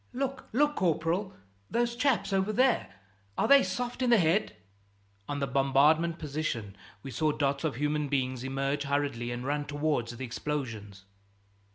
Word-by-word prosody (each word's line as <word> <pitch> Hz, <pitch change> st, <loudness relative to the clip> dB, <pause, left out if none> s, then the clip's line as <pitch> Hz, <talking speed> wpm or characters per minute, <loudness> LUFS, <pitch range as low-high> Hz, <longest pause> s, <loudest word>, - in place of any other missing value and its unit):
"Look, 270 Hz, +1 st, -3 dB
look, 295 Hz, +5 st, +2 dB
corporal, 175 Hz, +3 st, 0 dB, 0.3 s
those 235 Hz, 0 st, 0 dB
chaps 245 Hz, -5 st, +1 dB
over 195 Hz, +2 st, +1 dB
there 255 Hz, +3 st, +2 dB, 0.5 s
are -, -, +2 dB
they 280 Hz, 0 st, +8 dB
soft 245 Hz, -1 st, -3 dB
in 250 Hz, -, +2 dB
the 235 Hz, -, +6 dB
head?" 170 Hz, -, +2 dB, 0.7 s
On 145 Hz, -, -2 dB
the 140 Hz, -, 0 dB
bombarded 140 Hz, +5 st, +3 dB
position 140 Hz, -10 st, -3 dB, 0.3 s
we 135 Hz, -, -7 dB
saw 155 Hz, +6 st, +1 dB
dots 140 Hz, -1 st, -1 dB
of 155 Hz, -6 st, -1 dB
human 150 Hz, +2 st, 0 dB
beings 130 Hz, -2 st, -1 dB
emerge 135 Hz, +2 st, -1 dB
hurriedly 140 Hz, -4 st, -1 dB
and 120 Hz, +1 st, -4 dB
run 145 Hz, +1 st, -1 dB
towards 145 Hz, -6 st, -1 dB
the 130 Hz, -, -4 dB
explosions. 115 Hz, -7 st, -5 dB
150 Hz, 155 wpm, -29 LUFS, 135-195 Hz, 0.7 s, they